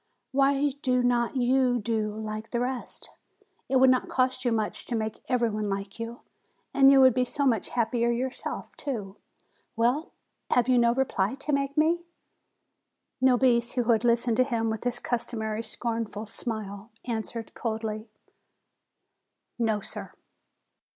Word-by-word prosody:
Why 275 +1 +3
do 250 -3 +2
not 245 0 +1
you 255 0 +3
do 215 -1 -1
like 215 0 -5
the 235 - -1
rest? 250 0 -4 0.6
It 265 - +1
would 260 0 +7
not 255 - +1
cost 255 0 +1
you 245 - +1
much 220 -2 -1
to 240 - -2
make 220 -1 -3
every 240 -3 +2
one 210 0 -2
like 195 +2 -4
you, 230 +1 -6 0.5
and 270 0 +7
you 275 -1 +7
would 260 -2 +7
be 255 - +2
so 280 +3 -2
much 230 -7 +1
happier 235 0 +1
yourself, 250 +2 -3
too! 210 -9 -5 0.6
Well, 245 +7 +1 0.4
have 245 -1 +3
you 255 -1 +4
no 235 0 +3
reply 250 -4 0
to 290 +2 -3
make 280 0 -1
me?" 330 +3 +3 1.2
Nobis, 245 -2 +4
who 250 - +1
had 225 0 +2
listened 235 -1 +3
to 255 - +6
him 230 -4 -1
with 220 +2 -5
his 245 - 0
customary 225 -2 -3
scornful 225 -1 -3
smile, 215 -1 -5 0.2
answered 230 -1 -4
coldly: 220 -1 -4 1.5
"No, 220 -3 +1
sir." - - -9
235 Hz, 150 wpm, -27 LUFS, 220-255 Hz, 1.5 s, would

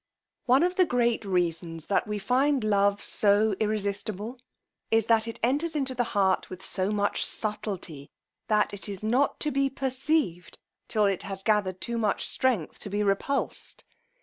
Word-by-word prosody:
One 260 +5 +5
of 360 +1 0
the 370 - +5
great 240 -6 +1
reasons 170 -3 -1
that 200 - 0
we 210 0 -2
find 260 +5 +2
love 200 -1 +2
so 205 0 +3
irresistable, 210 +2 -2 0.5
is, 225 -1 +3
that 225 0 +3
it 230 - -6
enters 295 +7 +1
into 270 -3 0
the 245 -1 +1
heart 190 -2 +2
with 185 +1 -8
so 190 0 -1
much 205 -1 0
subtilty, 190 -9 -4 0.4
that 210 -1 +2
it 200 +1 -7
is 200 0 -7
not 250 +6 +1
to 300 - 0
be 275 0 +1
perceived 265 - -1 0.3
till 215 -2 +2
it 195 -2 +1
has 195 -1 -6
gathered 200 -4 +1
too 235 0 -3
much 210 -3 0
strength 240 -12 0
to - - -8
be 205 +1 0
repulsed. 205 +8 -2
210 Hz, 165 wpm, -27 LUFS, 195-250 Hz, 0.5 s, One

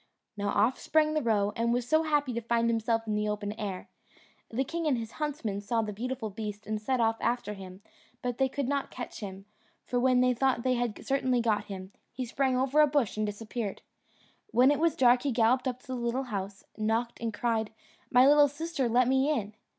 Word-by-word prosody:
Now 205 -1 -2
off 250 +4 +2
sprang 310 0 +2
the 310 - +1
roe, 210 -4 +1
and 230 +1 +1
was 240 0 0
so 315 +3 +4
happy 295 -5 +1
to 235 - -2
find 235 0 +1
himself 225 0 0
in 215 - -2
the 210 0 0
open 210 0 -3
air. 205 -4 -5 0.6
The 250 +4 0
king 330 +2 -3
and 270 -5 +2
his 225 -1 -5
huntsmen 265 -10 -2
saw 225 +2 0
the 210 -1 -4
beautiful 240 0 -4
beast 210 0 -6
and 215 0 -3
set 255 +4 0
off 225 -1 +2
after 240 -3 -1
him, 190 0 -11 0.4
but 245 0 -3
they 265 0 +3
could 280 -1 -2
not 280 0 -1
catch 245 - -7
him; 195 -2 -7 0.4
for 245 - 0
when 250 0 +4
they 250 0 +4
thought 250 -1 +1
they 255 - +2
had 240 -3 -2
certainly 260 -2 +1
got 215 -3 +1
him, 190 -1 -8 0.2
he 255 - -4
sprang 260 +2 0
over 270 +4 +3
a 300 - +6
bush 280 -7 +1
and 215 0 -1
disappeared. 210 0 -5 0.7
When 255 -5 +5
it 290 - +1
was 330 -1 +2
dark 245 -1 +5
he 280 - -1
galloped 250 +3 +2
up 255 0 -3
to - - -22
the 260 - -2
little 240 +2 -1
house, 195 0 -4 0.2
knocked, 225 +2 -1
and 230 -1 -1
cried, 220 0 -1 0.4
"My 250 +1 +6
little 290 0 +7
sister, 290 -2 -2
let 245 +1 +3
me 265 +2 +3
in." 220 -9 -1
240 Hz, 220 wpm, -29 LUFS, 215-265 Hz, 0.7 s, little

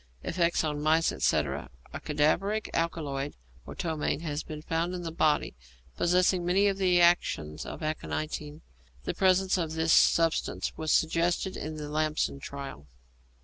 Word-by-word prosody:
Effects 170 -1 +1
on 150 -1 -2
mice, 160 +2 +3
etc. 70 -2 0 0.2
A - - -4
cadaveric 175 +9 0
alkaloid 145 -4 -2 0.3
or - - -8
ptomaine 160 -2 -2
has 150 -2 -3
been 155 -1 -8
found 170 +2 -1
in 175 - -5
the 165 - -4
body, 155 -2 +1 0.4
possessing 180 +1 +2
many 185 +3 +3
of 200 -1 +2
the 180 -2 +3
actions 170 - +2
of - - -7
aconitine. 155 0 -4 0.4
The - - -2
presence 185 0 +3
of 160 -2 -2
this 160 0 +2
substance 165 -1 +2
was 155 -1 -2
suggested 175 +3 +1
in 155 +1 -5
the 150 -1 -6
Lamson 155 -2 -1
trial. 135 - -8
160 Hz, 145 wpm, -28 LUFS, 150-175 Hz, 0.4 s, mice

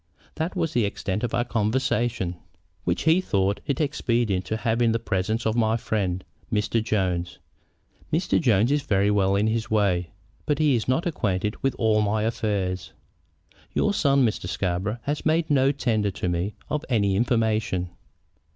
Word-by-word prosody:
That 165 +4 -3
was 165 -4 -1
the 120 - +2
extent 100 0 -2
of 120 - -1
our 120 - +2
conversation." 115 -4 0 0.5
"Which 85 0 0
he 160 +4 +4
thought 100 - 0
it 140 - -1
expedient 120 - 0
to 110 - -2
have 115 +1 0
in 115 -2 +3
the - - +2
presence 110 +2 -1
of 110 0 +1
my 110 -1 +2
friend, 95 -5 -2 0.3
Mr. 110 +1 +1
Jones. 95 -6 -1 0.7
Mr. 165 +2 +1
Jones 115 - +3
is 145 0 +2
very 100 -3 +2
well 100 -1 +2
in 100 +2 +2
his 110 0 -1
way, 95 -5 +1 0.4
but 150 - +2
he 150 -2 +3
is 115 - -1
not 130 +6 +1
acquainted 105 - -1
with 135 -1 0
all 110 -2 +3
my 105 +1 +1
affairs." 100 -5 -2 0.8
"Your 205 - +2
son, 140 -7 +3
Mr. 110 - -2
Scarborough, 95 +4 -2
has 145 +1 -2
made 160 0 +1
no 135 -1 +4
tender 110 -7 0
to 90 -1 -4
me 90 +4 -1
of 150 -1 -2
any 100 -5 +2
information." 110 -5 0
110 Hz, 170 wpm, -25 LUFS, 100-130 Hz, 0.8 s, he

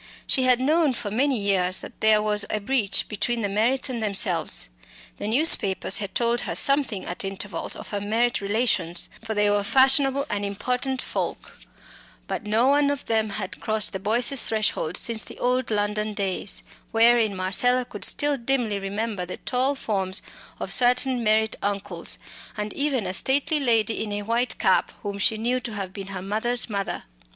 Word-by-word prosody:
She 260 - +2
had 250 -1 +4
known 300 +2 +2
for 230 -4 -5
many 265 +4 +1
years 185 -2 +1
that - - -11
there 215 -1 +4
was 210 -1 +2
a - - 0
breach 210 -2 +1
between 230 +3 -1
the 205 - 0
Merritts 225 +8 +1
and 245 -3 -4
themselves. 195 -6 0 0.5
The - - -4
newspapers 220 - +4
had 200 -2 -6
told 235 0 +2
her - - -4
something 275 -8 +2
at 175 - -4
intervals 195 +1 -5
of - - -10
her 205 -1 -3
Merritt 225 +4 0
relations, 200 -5 0
for 220 -1 -4
they 210 0 +3
were 205 0 +2
fashionable 270 +4 +3
and 205 -2 -2
important 250 +6 -2
folk, - - -5 0.7
but - - -3
no 220 +3 +2
one 285 +1 +4
of 285 -1 -3
them 220 -1 +1
had 200 -2 -3
crossed 215 -1 -1
the 190 - -3
Boyces' 235 +6 +1
threshold 215 -5 0
since 230 -1 -1
the - - -12
old 250 0 0
London 210 0 -1
days, 195 0 -2 0.3
wherein 225 -2 +4
Marcella 245 +7 +1
could 205 - -8
still 290 -1 +3
dimly 235 -5 0
remember 200 0 -3
the 180 - -7
tall 260 +3 0
forms 195 -6 -1 0.4
of - - -2
certain 250 0 +3
Merritt 220 0 +2
uncles, 200 -4 -3 0.4
and 210 0 -4
even 280 -7 -1
a 185 - -3
stately 280 - +1
lady 225 -5 +2
in 210 - -5
a 205 0 -3
white 235 +3 -1
cap - - +2
whom 200 -1 -4
she 215 +2 +2
knew 240 +3 0
to 235 -2 -6
have 195 -3 -4
been 195 -1 -7
her 190 -2 -6
mother's 220 +4 -1
mother. 200 -1 -3
220 Hz, 180 wpm, -24 LUFS, 200-250 Hz, 0.7 s, had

